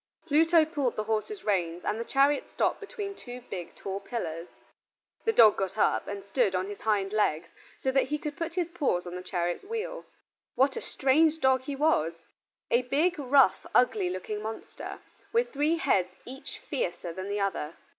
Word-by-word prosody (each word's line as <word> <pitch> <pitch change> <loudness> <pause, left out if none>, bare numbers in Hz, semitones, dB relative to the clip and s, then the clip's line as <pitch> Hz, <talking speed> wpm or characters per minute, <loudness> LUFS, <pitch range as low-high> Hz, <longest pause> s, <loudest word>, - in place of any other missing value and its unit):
Pluto 325 +1 +5
pulled 290 -6 -1
the 215 - -1
horses' 225 - -2
reins, 175 -4 0
and 215 - -1
the - - -1
chariot 275 +4 +2
stopped - - 0
between 405 -1 -6
two 250 -8 -9
big 175 -3 -6
tall 195 0 -4
pillars. 180 -6 -4 0.8
The 450 - +4
dog 225 - +7
got 195 +1 -2
up - - +2
and 200 -1 -6
stood 200 -2 +1
on 185 0 0
his 205 +1 -8
hind 205 -2 +1
legs, 165 -6 +1 0.3
so 265 - +2
that 270 0 +3
he 300 +3 -2
could 300 -1 -5
put 330 +1 -4
his 350 -2 0
paws 275 - 0
on 175 - -7
the 180 - -5
chariot 175 -1 -2
wheel. 455 +4 -4 0.5
What 270 +1 +3
a - - -3
strange 310 +4 +2
dog 265 -2 +3
he 285 - -3
was! 270 - +2 0.6
A 240 - +5
big, 300 +7 +1
rough, 270 -1 +4
ugly 210 -7 +3
looking 185 +3 -4
monster, 220 +1 -7 0.3
with 470 +1 +1
three 295 +3 +2
heads 185 - +1
each 270 +2 -8
fiercer 175 - -3
than 190 +3 -5
the 205 +1 -1
other. 190 -5 -2
245 Hz, 185 wpm, -29 LUFS, 190-300 Hz, 0.8 s, dog